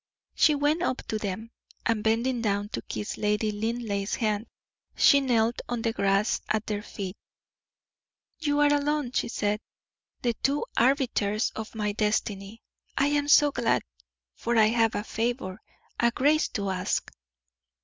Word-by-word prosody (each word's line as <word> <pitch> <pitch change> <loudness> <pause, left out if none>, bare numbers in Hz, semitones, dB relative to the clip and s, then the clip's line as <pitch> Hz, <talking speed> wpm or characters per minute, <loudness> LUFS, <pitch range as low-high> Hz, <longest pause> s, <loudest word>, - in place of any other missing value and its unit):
She 305 - +4
went 295 +3 +1
up 260 -8 -1
to 215 - -1
them, 210 +3 -4 0.3
and 225 -2 +1
bending 235 +3 +1
down 205 -2 0
to - - -4
kiss 210 - -5
Lady 210 +1 +1
Linleigh's 210 -2 -2
hand, 215 0 -1 0.5
she 280 - +6
knelt 235 -3 +1
on 240 -2 -2
the 230 - 0
grass 200 +1 +1
at 215 0 0
their 210 -1 -2
feet. 195 -3 -6 1.2
"You 295 -2 +1
are 290 0 +5
alone," 290 -2 0
she - - 0
said, 210 -2 -1 0.6
"the 240 -1 +2
two 280 +2 +1
arbiters 235 -5 +2
of 220 +1 -7
my 210 -1 -1
destiny. 210 0 -2 0.3
I 280 +1 +3
am 290 0 +1
so 295 0 +6
glad, 240 -3 +1 0.5
for 235 0 -1
I 215 -1 +6
have 225 -1 +2
a 205 - -1
favor 220 -3 -3 0.4
a 235 - +4
grace 290 +6 +2
to 200 -2 -3
ask." 185 -1 -2
225 Hz, 150 wpm, -27 LUFS, 210-260 Hz, 1.2 s, she